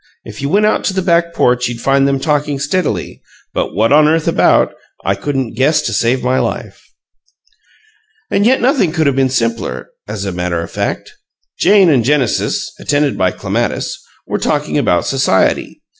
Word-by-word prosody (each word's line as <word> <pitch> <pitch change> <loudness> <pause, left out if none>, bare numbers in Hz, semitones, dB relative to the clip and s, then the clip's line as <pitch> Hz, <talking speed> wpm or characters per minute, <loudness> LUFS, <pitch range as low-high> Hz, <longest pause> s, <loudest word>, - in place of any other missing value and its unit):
If - - -9
you 140 - -2
went 205 +5 +3
out 215 - +1
to 190 - -1
the 190 - 0
back 170 -1 +2
porch 125 -4 +1
you'd 120 -1 -5
find 135 +2 +2
them 135 -1 0
talking 150 -1 0
steadily 145 - -2 0.3
but - - -2
what 110 +6 +2
on 150 0 +6
earth 160 0 +1
about - - +3 0.3
I - - +2
couldn't 135 -5 -3
guess 135 +7 +2
to - - -2
save 120 +3 +1
my 125 +1 +1
life!" - - -4 1.5
And 200 - +2
yet 255 +4 +3
nothing 245 - +2
could 160 -2 +1
have 140 -2 +2
been 135 -1 +2
simpler: 115 -2 -2 0.2
as 105 -1 -5
a 95 - -2
matter 90 -1 -2
of 85 - -6
fact, - - -3 0.5
Jane 195 0 +5
and 130 -5 +3
Genesis 135 -2 0
(attended 145 -1 0
by 95 - +1
Clematis) - - -3 0.2
were - - -3
talking - - -1
about 90 - +1
society. 135 -8 0
140 Hz, 175 wpm, -15 LUFS, 120-160 Hz, 1.5 s, on